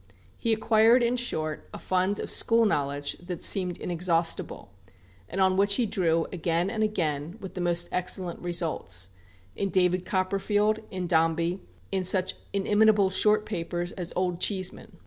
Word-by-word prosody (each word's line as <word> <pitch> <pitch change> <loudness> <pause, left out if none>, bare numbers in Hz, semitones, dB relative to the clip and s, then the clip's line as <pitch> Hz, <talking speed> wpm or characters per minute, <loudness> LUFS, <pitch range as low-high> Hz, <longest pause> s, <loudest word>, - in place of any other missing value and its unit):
He 230 - -2
acquired, 225 +2 +4
in 235 +1 +1
short, 155 -11 -4
a - - -5
fund 185 +2 0
of - - -4
school 230 0 +4
knowledge 145 -5 -1
that 175 -1 -6
seemed 180 -3 +3
inexhaustible, 170 - -1 0.6
and 190 - -4
on 190 0 +3
which 200 +1 +4
he 245 - +1
drew 165 -5 0
again 170 +2 0
and 220 -2 -3
again, 165 -5 -2
with 190 - -8
the 185 - -5
most 175 0 +1
excellent 180 -1 -1
results, 160 - -3 0.5
in 195 - -2
"David 180 -1 +2
Copperfield," 200 +3 0
in 185 -1 -4
"Dombey," 165 +2 +1 0.3
in 190 -1 0
such 185 0 +2 0.2
inimitable 205 0 +3
short 210 +2 +2
papers 175 -2 -4
as 175 -2 -5
"Old 180 -1 -1
Cheeseman." 185 -3 -2
185 Hz, 150 wpm, -27 LUFS, 170-200 Hz, 0.6 s, acquired